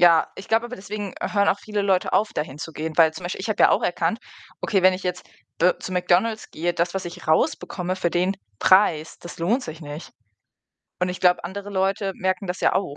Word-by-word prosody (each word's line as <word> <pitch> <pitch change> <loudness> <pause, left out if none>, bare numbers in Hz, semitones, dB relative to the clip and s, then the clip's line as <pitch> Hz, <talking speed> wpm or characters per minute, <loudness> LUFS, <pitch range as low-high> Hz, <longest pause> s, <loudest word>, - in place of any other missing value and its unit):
Ja, 170 -2 +6
ich 190 - -9
glaube 225 +1 +2
aber, 250 +1 -8
deswegen 205 0 -6
hören 200 -1 +1
auch 200 - +2
viele 210 0 -3
Leute 190 -2 +1
auf, 210 +1 +2
dahinzugehen. 155 +1 -5
Weil 160 -2 +6
zum 180 - -9
Beispiel, 175 - -4
ich - - -4
habe - - -1
ja - - +7
auch - - +2
erkannt: - - 0 0.4
„Okay, 195 - +1
wenn 185 0 +7
ich 185 - -6
jetzt 180 0 -3 0.3
d 180 +2 +5
zu 185 - -6
McDonald's 185 +5 +1
gehe, 175 +3 -1
das, 170 +1 -1
was 190 -1 -2
ich 175 -1 -8
rausbekomme 180 +3 0
für 175 -2 0
den 180 +3 +1 0.2
Preis, 170 -5 +4
das 175 - -10
lohnt 225 +11 +1
sich 160 +1 -8
nicht.“ 150 +1 -8 0.9
Und 180 - +1
ich 180 - -4
glaube, 180 -1 +4
andere 200 +3 -6
Leute 195 +1 0
merken 185 +1 -1
das 180 0 -4
ja - - +3
auch. 185 -7 -1
185 Hz, 220 wpm, -23 LUFS, 170-195 Hz, 0.9 s, ja